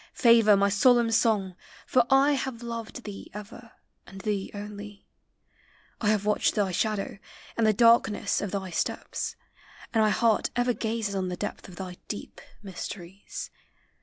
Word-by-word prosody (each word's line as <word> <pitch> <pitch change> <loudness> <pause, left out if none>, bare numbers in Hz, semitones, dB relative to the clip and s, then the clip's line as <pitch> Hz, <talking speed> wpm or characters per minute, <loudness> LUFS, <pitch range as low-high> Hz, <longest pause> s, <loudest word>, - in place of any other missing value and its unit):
Favor 230 -4 +6
my 200 +1 +3
solemn 235 +3 +4
song, 210 -5 +2 0.3
for 245 -2 +3
I 270 +2 +5
have 260 -4 -2
loved 230 +1 -6
Thee 205 -2 -8
ever, 220 +2 -10 0.3
and 195 - -10
thee 205 -2 -2
only; 205 0 -8 1.0
I 210 - +2
have 210 -1 +1
watched 210 0 +2
Thy 200 -3 +1
shadow, 200 +1 -1 0.4
and 225 -1 +2
the - - +6
darkness 225 -2 +3
of 205 - -2
tlry 190 -2 -4
steps, - - -2 0.6
And 220 -1 +4
my 215 - +4
heart 225 0 +2
ever 245 0 +2
gazes 220 -2 -2
on 190 -1 -1
the 180 - -4
depth 205 - -5
Of 180 - -11
thy 180 -1 -7
deep 205 - -7 0.2
mysteries. 190 0 -7
210 Hz, 155 wpm, -27 LUFS, 200-230 Hz, 1.0 s, Favor